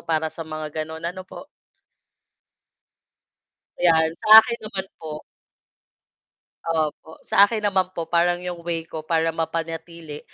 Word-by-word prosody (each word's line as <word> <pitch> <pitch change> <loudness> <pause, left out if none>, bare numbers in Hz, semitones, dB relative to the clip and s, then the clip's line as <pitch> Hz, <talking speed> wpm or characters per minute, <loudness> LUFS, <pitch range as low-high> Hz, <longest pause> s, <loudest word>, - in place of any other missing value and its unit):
para 160 -1 -1
sa - - -11
mga 155 -1 -6
ganon, 160 +1 -7
ano 185 +2 -5
po. - - -10 2.3
Yan, 160 -2 +4 0.2
sa - - -1
akin 235 +1 -4
naman 195 -3 -5
po 155 -1 -7 1.5
opo, 160 -1 -2
sa 200 +1 +5
akin 220 -1 -3
naman 190 -3 +2
po 170 - -2
parang 175 +1 +2
'yong 180 -1 -5
way 165 -1 -2
ko 160 0 -7
para 165 0 +1
mapanatili, 165 -1 -5
165 Hz, 130 wpm, -23 LUFS, 160-180 Hz, 2.3 s, sa